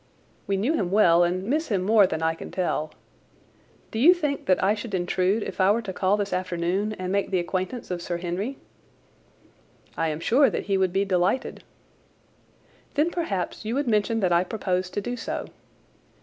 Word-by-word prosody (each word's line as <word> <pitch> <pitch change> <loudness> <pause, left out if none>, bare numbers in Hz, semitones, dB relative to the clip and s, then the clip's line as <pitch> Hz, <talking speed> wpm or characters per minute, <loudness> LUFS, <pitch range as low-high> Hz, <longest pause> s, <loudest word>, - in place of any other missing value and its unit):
We 195 - +1
knew 235 +11 +1
him 195 - 0
well 175 -4 +5
and 180 +2 0
miss 300 +10 -1
him 195 -4 0
more 205 0 +5
than 160 -2 -3
I 160 0 +2
can 165 - -9
tell. 155 -4 -2 1.0
Do 220 - -3
you 340 +9 +7
think 295 -5 -3
that 185 0 +3
I 200 +2 +4
should 210 -1 -5
intrude 185 +4 +1
if - - -4
I 185 - +5
were 230 +3 +2
to 190 -3 -5
call 190 +2 +1
this 205 -1 -2
afternoon 185 +3 -1
and 185 -3 -4
make 200 0 0
the 190 - +1
acquaintance 185 +5 -3
of 175 -1 -3
Sir 175 0 -3
Henry?" 185 +10 -3 1.4
"I 165 - 0
am 155 -1 -3
sure 255 - +4
that - - -3
he 200 - 0
would 190 -1 +2
be 195 +2 +1
delighted." 190 +5 0 1.3
"Then 310 +4 +2
perhaps 210 - -3
you 220 +3 -2
would 285 -1 -1
mention 225 0 +1
that 185 -2 +2
I 170 +1 +4
propose 185 -2 -2
to 205 - -3
do 245 +4 -4
so. 235 - -4
195 Hz, 190 wpm, -25 LUFS, 180-220 Hz, 1.4 s, you